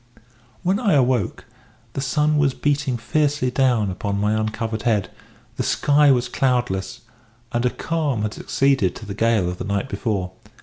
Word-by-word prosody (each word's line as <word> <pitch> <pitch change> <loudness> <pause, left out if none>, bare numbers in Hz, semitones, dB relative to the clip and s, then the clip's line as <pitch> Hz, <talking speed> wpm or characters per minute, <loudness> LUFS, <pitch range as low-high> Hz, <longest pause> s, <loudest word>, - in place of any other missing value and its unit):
"When 190 +3 +1
I 210 -8 +2
awoke 125 -7 +1 0.5
the 135 - -3
sun 150 +2 +1
was 140 -3 +2
beating 140 -3 0
fiercely 145 +2 0
down 125 -6 +2
upon 100 +2 -3
my 105 +1 +1
uncovered 110 +1 -2
head; 105 -5 0 0.5
the - - -1
sky 145 0 +3
was 125 -2 +3
cloudless; 125 -8 -1 0.5
and 120 +1 +1
a - - +2
calm 145 -7 -2
had 110 0 -2
succeeded 135 -9 +1
to 110 - -9
the 100 - -5
gale 110 -3 +2
of 90 0 -4
the - - -3
night 100 +5 -2
before. 100 -8 -2
125 Hz, 165 wpm, -22 LUFS, 105-140 Hz, 0.5 s, sky